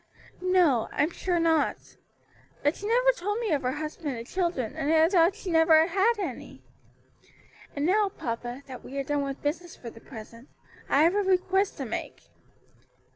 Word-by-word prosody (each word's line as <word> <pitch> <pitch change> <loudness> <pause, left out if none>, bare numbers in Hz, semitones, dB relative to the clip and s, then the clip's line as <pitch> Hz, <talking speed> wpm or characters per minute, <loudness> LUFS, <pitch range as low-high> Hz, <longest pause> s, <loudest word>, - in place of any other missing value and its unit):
"No, 355 -11 +3
I'm 305 +4 +1
sure 350 0 -1
not. 325 -2 0 0.7
But 290 +3 +2
she 410 - -6
never - - +4
told 415 -3 -3
me 455 -5 -2
of 290 -3 +1
her 255 -1 -1
husband 300 -2 -5
and 230 - -7
children, 335 - -2
and 310 -1 -1
I 320 0 +5
thought 350 0 +3
she 370 - -6
had 325 - +4
never 320 -1 +6
had 390 +6 +2
any. 350 - -6 1.1
And 285 0 -1
now, 405 +3 +3
papa, 245 -4 -5
that 260 -2 -10
we 275 - -8
are 275 - -1
done 290 +1 -1
with 275 -1 -5
business 330 +4 -3
for 235 - -9
the 225 - -15
present, 230 +1 -12 0.4
I 285 - +4
have 335 +3 +4
a 410 - +1
request 380 +1 +1
to - - -4
make." - - -6
320 Hz, 180 wpm, -27 LUFS, 275-370 Hz, 1.1 s, never